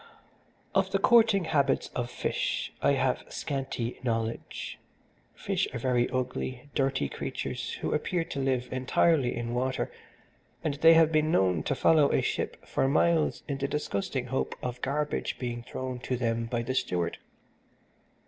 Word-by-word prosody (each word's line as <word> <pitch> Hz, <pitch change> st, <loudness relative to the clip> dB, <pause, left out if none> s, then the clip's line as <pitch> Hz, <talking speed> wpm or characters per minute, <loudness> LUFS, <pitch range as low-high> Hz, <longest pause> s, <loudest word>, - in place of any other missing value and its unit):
"Of 195 Hz, -1 st, +2 dB
the 195 Hz, -, +2 dB
courting 220 Hz, -2 st, +5 dB
habits 140 Hz, -4 st, +1 dB
of 120 Hz, -1 st, -3 dB
fish -, -, -2 dB
I -, -, +4 dB
have -, -, +1 dB
scanty 135 Hz, -4 st, -3 dB
knowledge. 115 Hz, -2 st, -3 dB, 0.6 s
Fish -, -, -1 dB
are -, -, 0 dB
very 120 Hz, 0 st, +1 dB
ugly, 130 Hz, +1 st, -3 dB
dirty 135 Hz, -, +1 dB
creatures -, -, -4 dB
who -, -, -2 dB
appear 175 Hz, -2 st, 0 dB
to 140 Hz, -, -5 dB
live 130 Hz, -2 st, 0 dB
entirely 130 Hz, +1 st, +2 dB
in 120 Hz, 0 st, -3 dB
water, 130 Hz, +1 st, -1 dB, 0.7 s
and 155 Hz, -3 st, 0 dB
they 160 Hz, +3 st, +6 dB
have 160 Hz, -1 st, +6 dB
been 155 Hz, 0 st, +2 dB
known 90 Hz, -, +3 dB
to -, -, -1 dB
follow 155 Hz, -3 st, +4 dB
a -, -, +2 dB
ship -, -, -3 dB
for 135 Hz, -, +1 dB
miles 160 Hz, +3 st, +2 dB
in 140 Hz, -2 st, -3 dB
the 140 Hz, -, 0 dB
disgusting 130 Hz, -3 st, -2 dB
hope 130 Hz, +2 st, -2 dB
of 125 Hz, 0 st, -4 dB
garbage 150 Hz, +2 st, -1 dB
being 120 Hz, -2 st, -4 dB
thrown 130 Hz, +1 st, -5 dB
to 125 Hz, +1 st, -2 dB
them 115 Hz, -1 st, 0 dB
by 120 Hz, 0 st, -1 dB
the 130 Hz, -, -2 dB
steward. 90 Hz, -9 st, -1 dB
130 Hz, 155 wpm, -29 LUFS, 120-150 Hz, 0.7 s, they